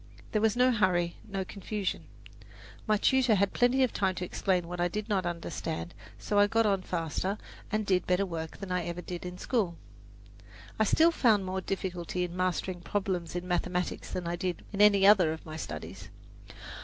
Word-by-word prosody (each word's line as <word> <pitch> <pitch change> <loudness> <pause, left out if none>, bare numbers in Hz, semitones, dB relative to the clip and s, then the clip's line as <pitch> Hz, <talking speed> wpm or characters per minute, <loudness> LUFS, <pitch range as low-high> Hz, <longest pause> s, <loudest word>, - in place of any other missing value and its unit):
There 215 - +1
was 220 0 +3
no 250 +1 +4
hurry, 180 -6 +1
no 195 -1 -2
confusion. 200 0 -4 0.8
My 215 0 +4
tutor 255 0 +3
had 200 0 +1
plenty 245 +2 +3
of 255 - +1
time 190 -2 +1
to 180 - -3
explain 180 -1 0
what 175 0 -4
I 175 - +3
did 210 +4 -4
not 190 -5 0
understand, 170 -1 -4 0.2
so 205 - 0
I 205 - +6
got 225 +1 +2
on 195 -2 +2
faster 180 +3 -2 0.3
and 215 0 0
did 185 -3 +1
better 180 +2 +2
work 160 -3 -5
than 195 -2 -7
I 180 -1 0
ever 175 +1 -5
did 180 +1 -6
in 180 0 -7
school. 195 -6 0 1.0
I 220 - +4
still 325 +10 +5
found 220 - +3
more 190 0 -2
difficulty 180 -2 -3
in 175 0 -4
mastering 185 0 -1
problems 180 -1 -2
in 175 0 -3
mathematics 180 0 -1
than 180 - -3
I 170 - -1
did 180 -1 -3
in 200 - 0
any 200 -2 +6
other 195 -6 +6
of 160 - -10
my 155 -1 -7
studies. 75 - -7
185 Hz, 190 wpm, -30 LUFS, 175-210 Hz, 1.0 s, I